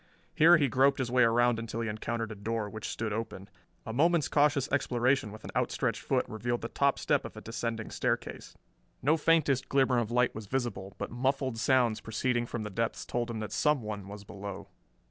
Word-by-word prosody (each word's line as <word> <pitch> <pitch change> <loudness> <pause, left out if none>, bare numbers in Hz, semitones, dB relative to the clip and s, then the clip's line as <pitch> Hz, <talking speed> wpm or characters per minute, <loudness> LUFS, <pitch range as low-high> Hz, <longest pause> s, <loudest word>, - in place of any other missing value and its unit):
Here 170 +3 +7
he 145 -3 +2
groped 135 +3 +3
his 125 -3 -2
way 125 0 +4
around 120 0 +4
until 115 0 -4
he 115 - -2
encountered 115 +1 -3
a - - -6
door, 110 +1 -2
which 110 0 -6
stood 110 -2 -3
open. 105 -3 -5 0.4
A 110 - -5
moment's 165 +3 +3
cautious 145 -2 +2
exploration 125 -4 +1
with 110 +1 -11
an - - -7
outstretched - - 0
foot - - 0
revealed 120 +2 -2
the 115 - -4
top 140 -1 +2
step - - +1
of - - -9
a - - -7
descending 115 -1 -4
staircase. - - -3 0.5
No 150 +4 +4
faintest 150 -5 +2
glimmer 135 -3 +3
of 115 -2 -2
light 125 +1 +2
was 110 -1 -8
visible, 110 -6 -3
but - - -5
muffled 130 0 -1
sounds 120 -3 +2
proceeding 120 +2 -1
from 115 -2 -4
the 105 - -5
depths 115 +4 -2
told 120 0 -2
him 115 - -4
that 105 -2 -5
someone 110 -7 0
was 100 0 -9
below. 100 0 -8
120 Hz, 200 wpm, -30 LUFS, 110-135 Hz, 0.5 s, Here